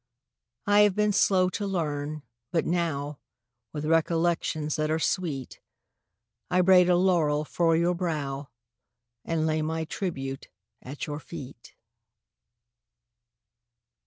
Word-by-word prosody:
I 205 0 +4
have 210 -2 +5
been 210 0 +2
slow 185 -2 +4
to 200 +2 -3
learn, 150 -5 -3 0.3
but 165 - 0
now, 150 -4 -2 0.5
With 150 0 -4
recollections 165 -1 +1
■ - - -2
that 155 0 0
are 160 - +1
sweet, 160 -6 -2 0.9
I 180 0 +3
braid 180 -1 +6
a 180 - +5
laurel 160 -5 +2
for 165 +1 +2
your 170 +2 +2
brow 150 -6 -3 0.8
And 160 -1 0
lay 155 0 +1
my 160 +1 -2
tribute 135 -7 -4 0.3
at 140 +3 -6
your 150 0 -5
eet. 135 -7 -10
160 Hz, 120 wpm, -27 LUFS, 150-180 Hz, 0.9 s, braid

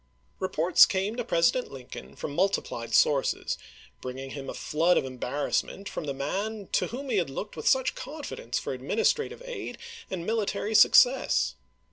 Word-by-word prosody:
Eeports 180 -2 +5
came 195 +3 -1
to 245 - -2
President 225 +5 +1
Lincoln 125 - -10
from 145 - -5
multi 195 +5 +2
plied 115 -1 -7
sources, 140 -2 +2 0.5
bringing 130 +1 -6
him 140 -1 -6
a - - -4
flood 165 +4 +2
of - - +1
embarrass 130 +2 -1
ment 200 +1 -10
from - - -5
the 140 - -2
man 200 +10 -3
to - - +1
whom 265 +3 -6
he 220 - +2
had 175 -6 +1
looked 200 +10 -6
with - - -5
such 260 -1 +3
confidence 305 - -5
for - - -3
administrative 455 +1 0
aid 480 -6 -6 0.3
and 175 -3 -4
military 215 -1 -1
success. 245 +5 +5
190 Hz, 165 wpm, -28 LUFS, -, 0.5 s, Eeports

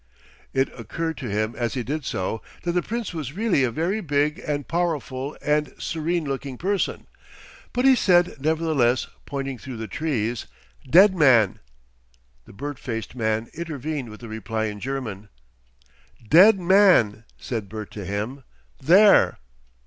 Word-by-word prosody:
It 135 0 +1
occurred 160 +8 -4
to 130 -5 -5
him 110 +2 -1
as 120 0 -2
he 125 - -2
did 145 +3 -4
so 105 +2 -3 0.2
that 175 - 0
the 180 +1 +1
Prince 230 0 -4
was 150 -5 -5
really 205 -7 +1
a 125 - +2
very 170 - -1
big 150 +1 0
and 145 -6 -3
powerful 150 -5 -2
and 150 0 +1
serene 165 +1 -2
looking 135 -1 -4
person. 195 +5 -1 0.7
But 250 +1 0
he 270 - +8
said, 175 -7 +3
nevertheless, 155 -5 +1 0.2
pointing 135 -2 -4
through 130 -3 -8
the 110 0 -5
trees, 120 -7 -2 0.4
"dead 190 +6 +7
man!" 125 - +4 0.9
The - - -15
bird 145 +6 -6
faced 115 -3 -5
man 110 -2 -1
intervened 150 -5 -4
with 110 +2 -12
a - - -7
reply 110 0 -3
in 105 -1 -5
German. 110 -6 -5 1.0
"Dead 195 - +7
man!" 175 - +4
said 110 -5 -5
Bert 110 0 -7
to 105 - -7
him. 105 +8 -4 0.4
"There." 190 +9 +5
140 Hz, 150 wpm, -24 LUFS, 115-170 Hz, 1.0 s, he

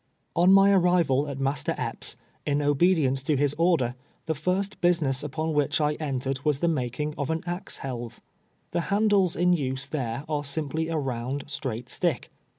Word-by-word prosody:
On' 175 +2 +5
my 195 +1 +7
arrival 175 -7 +3
at 140 -2 -5
Master 135 +1 -1
Epps', - - -4 0.3
in 145 -1 0
oLedience 145 -2 +2
to 145 +2 +1
liis 145 0 +2
order, 165 -9 +3 0.3
the 160 - 0
first 185 +6 -2
business 165 -7 +2
npon 155 +3 -2
wliich 145 0 +1
I 150 -1 +2
entered 135 -1 -2
was 150 -3 +1
tlio 170 +1 +2
making 145 +2 -2
of 140 0 -2
an 160 0 -1
axe 175 +2 -4
lielve. 120 -3 -5 0.5
The 175 - 0
handles 200 -3 +3
in 180 +1 +3
nse 135 -4 -2
tliere 125 -2 -3
are 150 -2 -1
simply 155 +2 -2
a 165 -1 -1
round, 130 0 -3
straight 125 -4 -4
stick. 165 0 -1
150 Hz, 170 wpm, -26 LUFS, 135-170 Hz, 0.5 s, my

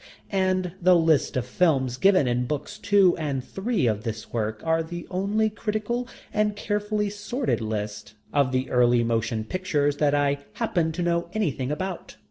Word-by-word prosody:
And 185 -2 +1
the 180 +1 +6
lists 160 -5 +3
of 125 - -1
films 130 -4 +1
given 185 -4 +4
in 125 0 0
books 150 +9 -4
two 200 -4 +4
and 140 -5 -2
three 205 - -1
of 110 -3 +1
this 110 -2 -6
work 110 -2 -2
are 160 0 +2
the 175 +1 -6
only 200 +4 +1
critical 215 +3 -2 0.3
and 210 -1 +1
carefully 210 0 -1
sorted 215 - -2
lists 105 -1 -4 0.2
of 140 -3 +3
the 130 0 0
early 120 -1 +4
motion 115 -1 0
pictures 145 -2 0
that 145 -1 +2
I 145 0 +1
happen 175 -9 0
to 175 +2 -2
know 170 0 0
anything 145 -11 -1
about. 185 +4 -4
165 Hz, 165 wpm, -25 LUFS, 125-200 Hz, 0.3 s, the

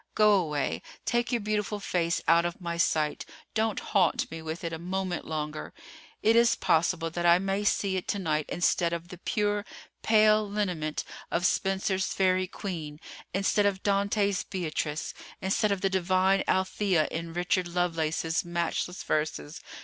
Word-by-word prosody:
Go 210 -1 +6
away, 150 -8 0 0.2
take 240 0 0
your 240 -2 +1
beautiful 210 0 -1
face 170 -3 0
out 170 +1 +5
of 175 0 -3
my 170 -2 -3
sight; 155 -3 +1 0.3
don't 220 -1 0
haunt 185 -5 +1
me 165 0 -6
with 160 +2 -5
it 165 0 -3
a 160 - -4
moment 185 0 -3
longer. 150 -1 -4 0.5
It 225 +1 +5
is 235 0 +5
possible 165 0 +1
that 175 +1 -3
I 170 0 +7
may 195 +2 -1
see 200 -2 +1
it 185 - -4
to - - 0
night 155 -5 -1
instead 170 0 +1
of 170 +1 -5
the 180 - -10
pure, 205 0 0 0.4
pale 215 -1 +4
lineament 180 -7 -2 0.3
of 175 +2 0
Spenser's 190 0 +1
Faerie 185 -1 +1
Queene—instead 185 +3 -3
of 195 -1 -2
Dante's 200 -1 +1
Beatrice—instead 180 +4 -2
of 200 -2 -1
the 195 - +2
divine 190 +1 +2
Althea 190 -3 +1
in 165 +1 -4
Richard 180 +1 0
Lovelace's 165 -2 0
matchless 175 +1 -2
verses. 150 - -2
180 Hz, 150 wpm, -28 LUFS, 165-200 Hz, 0.5 s, I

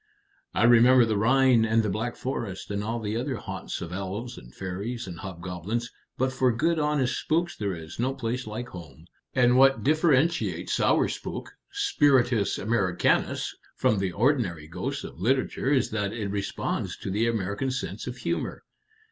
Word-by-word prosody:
"I - - +2
remember 120 +1 +7
the 110 -1 0
Rhine 125 +2 +4
and 115 0 +2
the 105 - 0
Black 110 +4 -2
Forest 105 -8 -4
and 100 0 -2
all 115 +2 -2
the 110 -1 -3
other 130 +3 -2
haunts - - -6
of 85 +1 -6
elves 100 +6 -4
and - - -12
fairies 100 - -5
and 85 -3 -8
hobgoblins; 95 +6 -4 0.3
but 130 0 0
for 130 -1 +3
good 160 +8 +1
honest 150 -4 +1
spooks 170 +2 0
there 100 -3 -2
is 80 +3 -10
no 130 +3 0
place 125 -1 -3
like 115 +3 -5
home. 80 -4 -11 0.3
And 125 -1 +4
what 135 +1 +5
differentiates 155 +2 +2
our - - +3
spook - - -6 0.2
spiritus 135 - +2
Americanus 100 -5 +1 0.2
from 105 - +2
the 95 -1 -1
ordinary 100 - +1
ghost 125 - -4
of - - -9
literature 130 +3 +1
is 135 -5 +2
that 105 -2 -1
it 110 -3 -3
responds 100 -1 -3
to 95 - -5
the 110 +4 +1
American 110 +2 -1
sense 130 - -4
of - - -5
humor. - - -3
115 Hz, 165 wpm, -27 LUFS, 100-130 Hz, 0.3 s, remember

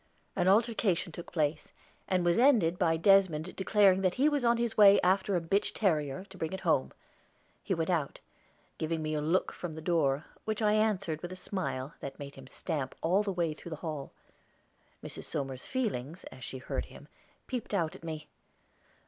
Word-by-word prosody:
An 180 - +1
altercation 200 -4 +2
took 170 +2 -9
place, 155 -2 -1 0.3
and 185 -2 +1
was 175 +4 +3
ended 220 -11 +4
by 165 -2 +3
Desmond 185 -2 +3
declaring 195 -1 +4
that 185 -2 +1
he 275 +3 +3
was 290 -3 +1
on 235 0 +4
his 235 -1 -1
way 200 -1 +8
after 190 +2 +2
a - - +3
bitch 195 +5 0
terrier, 155 -6 0
to 190 - -12
bring 160 +2 -3
it 190 - -4
home. - - +1 0.7
He 190 - -1
went 165 +2 -1
out, 155 -5 -1 0.6
giving 160 0 -1
me 155 0 -2
a 150 - 0
look 165 +5 +1
from 170 -3 -6
the - - -6
door, 155 -3 +1 0.2
which 215 -1 -2
I 210 -2 +3
answered 195 -7 +1
with 175 - -6
a - - -6
smile 170 -7 -4
that 135 - -7
made 140 -1 -8
him 135 -1 -12
stamp 140 -2 -4
all 180 +5 +3
the 205 -1 -2
way 170 -4 0
through 165 - -10
the 160 - -4
hall. 150 -4 -4 0.9
Mrs. - - -7
Somers's 135 -2 -4
feelings 180 - -3
as 130 - -11
she 130 - -6
heard 130 - -4
him - - -14 0.4
peeped 250 -3 -5
out 170 -6 0
at - - -13
me. 155 -2 -6
175 Hz, 190 wpm, -31 LUFS, 155-200 Hz, 0.9 s, way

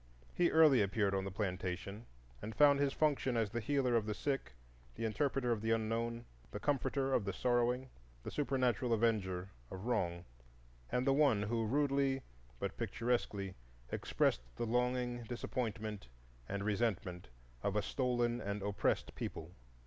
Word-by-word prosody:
He 175 - +3
early 155 -6 +6
appeared 100 0 +1
on 95 0 0
the - - -2
plantation 95 +2 -3 0.3
and 110 +1 -6
found 145 -1 +6
his 140 -1 +2
function 140 -5 +1
as 110 -3 +1
the 120 - -1
healer 130 0 +1
of 110 -2 +2
the 105 - -1
sick, 135 - -2 0.4
the 115 - -3
interpreter 130 +2 0
of 110 -3 0
the 110 - -1
Unknown, 115 +1 0 0.2
the 105 - -5
comforter 135 0 0
of 115 - +3
the 100 - -2
sorrowing, 125 +1 +1 0.4
the - - -5
supernatural 125 -4 +1
avenger 100 -5 +1 0.2
of 95 +3 -7
wrong, 90 -8 0 0.7
and 125 - +1
the 135 - +4
one 135 -8 +4
who 115 +1 0
rudely 140 0 +1 0.4
but - - -3
picturesquely 105 -4 -1 0.4
expressed - - +1
the 120 - -2
longing, 125 +1 0
disappointment, 110 - -3 0.4
and 100 0 -2
resentment 100 - -1 0.3
of 100 - -1
a 105 - +2
stolen 120 0 0
and 100 -1 -3
oppressed 100 0 0
people. 80 +2 -5
115 Hz, 150 wpm, -36 LUFS, 105-130 Hz, 0.7 s, early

